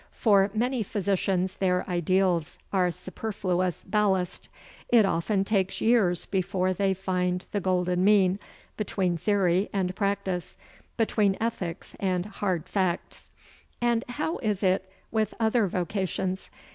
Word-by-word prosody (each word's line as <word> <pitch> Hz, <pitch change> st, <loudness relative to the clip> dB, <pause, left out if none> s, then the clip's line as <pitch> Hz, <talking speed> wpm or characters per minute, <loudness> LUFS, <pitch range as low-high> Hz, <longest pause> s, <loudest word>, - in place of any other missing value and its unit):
For 200 Hz, -3 st, +3 dB
many 245 Hz, +2 st, 0 dB
physicians 190 Hz, -2 st, 0 dB
their 180 Hz, -1 st, +1 dB
ideals 180 Hz, -1 st, +1 dB, 0.2 s
are 185 Hz, -2 st, +3 dB
superfluous 185 Hz, -2 st, -2 dB
ballast. 190 Hz, -3 st, 0 dB, 0.4 s
It 230 Hz, -4 st, +6 dB
often 195 Hz, +2 st, 0 dB
takes 195 Hz, -2 st, 0 dB
years 215 Hz, -7 st, +3 dB
before 185 Hz, -1 st, 0 dB
they 195 Hz, +1 st, +1 dB
find 180 Hz, -1 st, -1 dB
the 205 Hz, -, 0 dB
golden 180 Hz, -1 st, +1 dB
mean 195 Hz, -2 st, +4 dB, 0.4 s
between 190 Hz, -4 st, 0 dB
theory 185 Hz, +1 st, +2 dB
and 185 Hz, -2 st, -1 dB
practice, 195 Hz, -3 st, -2 dB, 0.4 s
between 210 Hz, -3 st, +2 dB
ethics 195 Hz, -6 st, -4 dB
and 185 Hz, -2 st, 0 dB
hard 185 Hz, -5 st, -2 dB
facts. 185 Hz, -3 st, -2 dB, 0.5 s
And 240 Hz, -1 st, +1 dB
how 300 Hz, +6 st, -2 dB
is 210 Hz, -4 st, -1 dB
it 190 Hz, 0 st, +1 dB, 0.2 s
with 215 Hz, -1 st, 0 dB
other 225 Hz, -1 st, +3 dB
vocations? 185 Hz, +1 st, -2 dB
190 Hz, 120 wpm, -27 LUFS, 180-210 Hz, 0.5 s, It